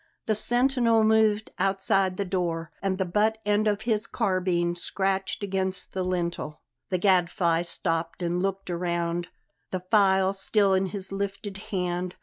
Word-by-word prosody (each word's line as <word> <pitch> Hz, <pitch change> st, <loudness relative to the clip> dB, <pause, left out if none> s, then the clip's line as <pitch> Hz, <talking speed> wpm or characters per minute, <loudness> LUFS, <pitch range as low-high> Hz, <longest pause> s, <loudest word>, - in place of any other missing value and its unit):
The 220 Hz, -, +2 dB
sentinel 240 Hz, 0 st, +2 dB
moved 220 Hz, -1 st, +3 dB
outside 195 Hz, 0 st, +1 dB
the 200 Hz, -, -1 dB
door, 170 Hz, -3 st, -2 dB
and 195 Hz, -1 st, 0 dB
the 190 Hz, -, 0 dB
butt 210 Hz, +5 st, +1 dB
end 210 Hz, +1 st, +2 dB
of 210 Hz, 0 st, 0 dB
his 220 Hz, -2 st, 0 dB
carbine 180 Hz, -5 st, 0 dB
scratched 190 Hz, +2 st, -1 dB
against 190 Hz, -1 st, -2 dB
the 190 Hz, -, -2 dB
lintel. 170 Hz, -4 st, -3 dB, 0.3 s
The 185 Hz, -, +1 dB
Gadfly 175 Hz, -3 st, +2 dB
stopped 165 Hz, 0 st, -3 dB
and 175 Hz, +1 st, 0 dB
looked 195 Hz, -1 st, -2 dB
round, 170 Hz, 0 st, -1 dB, 0.4 s
the 185 Hz, -, -3 dB
file 190 Hz, -2 st, +4 dB
still 200 Hz, 0 st, +2 dB
in 190 Hz, 0 st, +2 dB
his 190 Hz, +1 st, -6 dB
lifted 200 Hz, 0 st, -4 dB
hand. 180 Hz, -1 st, -2 dB
190 Hz, 145 wpm, -26 LUFS, 175-205 Hz, 0.4 s, file